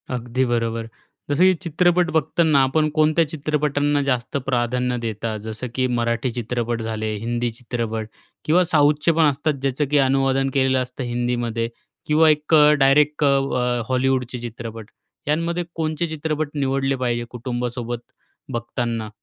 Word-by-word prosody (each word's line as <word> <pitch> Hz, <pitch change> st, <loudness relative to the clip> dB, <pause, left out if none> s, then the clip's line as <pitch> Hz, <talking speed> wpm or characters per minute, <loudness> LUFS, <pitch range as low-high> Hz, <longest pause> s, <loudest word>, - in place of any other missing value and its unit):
अगदी 125 Hz, +2 st, -1 dB
बरोबर. 115 Hz, -1 st, -1 dB, 0.4 s
जसं 145 Hz, +5 st, +3 dB
की 185 Hz, 0 st, +6 dB
चित्रपट 175 Hz, +1 st, +2 dB
बघताना, 155 Hz, -1 st, +2 dB
आपण 155 Hz, +4 st, +2 dB
कोणत्या 155 Hz, +1 st, +3 dB
चित्रपटांना 145 Hz, -1 st, 0 dB
जास्त 135 Hz, -1 st, -1 dB
प्राधान्य 125 Hz, -1 st, 0 dB
देता? 110 Hz, -1 st, -3 dB
जसं 110 Hz, +4 st, -6 dB
की 130 Hz, -1 st, +1 dB
मराठी 120 Hz, +1 st, 0 dB
चित्रपट 120 Hz, 0 st, -2 dB
झाले, 110 Hz, -1 st, -3 dB
हिंदी 120 Hz, +2 st, -2 dB
चित्रपट 115 Hz, -2 st, -4 dB, 0.4 s
किंवा 175 Hz, +4 st, +4 dB
साऊथचे 150 Hz, -1 st, +3 dB
पण 160 Hz, 0 st, +3 dB
असतात, 150 Hz, +2 st, -1 dB
ज्याचं 135 Hz, +2 st, 0 dB
की 150 Hz, -, +4 dB
अनुवादन 135 Hz, 0 st, +2 dB
केलेलं 130 Hz, -1 st, +2 dB
असतं 125 Hz, +1 st, -5 dB
हिंदीमध्ये 120 Hz, -1 st, -1 dB, 0.4 s
किंवा 155 Hz, +1 st, +4 dB
एक 150 Hz, +1 st, +1 dB, 0.3 s
डायरेक्ट 145 Hz, +2 st, +4 dB
अ, 130 Hz, -3 st, +1 dB
हॉलिवूडचे 130 Hz, -1 st, 0 dB
चित्रपट, 115 Hz, -2 st, -7 dB, 0.4 s
यांमध्ये 165 Hz, +3 st, 0 dB
कोणचे 160 Hz, +1 st, -1 dB
चित्रपट 155 Hz, -1 st, -2 dB
निवडले 135 Hz, -1 st, 0 dB
पाहिजे, 120 Hz, -2 st, -1 dB
कुटुंबासोबत 120 Hz, -1 st, -4 dB, 0.5 s
बघताना? 115 Hz, -2 st, -3 dB
130 Hz, 130 wpm, -22 LUFS, 120-150 Hz, 0.5 s, की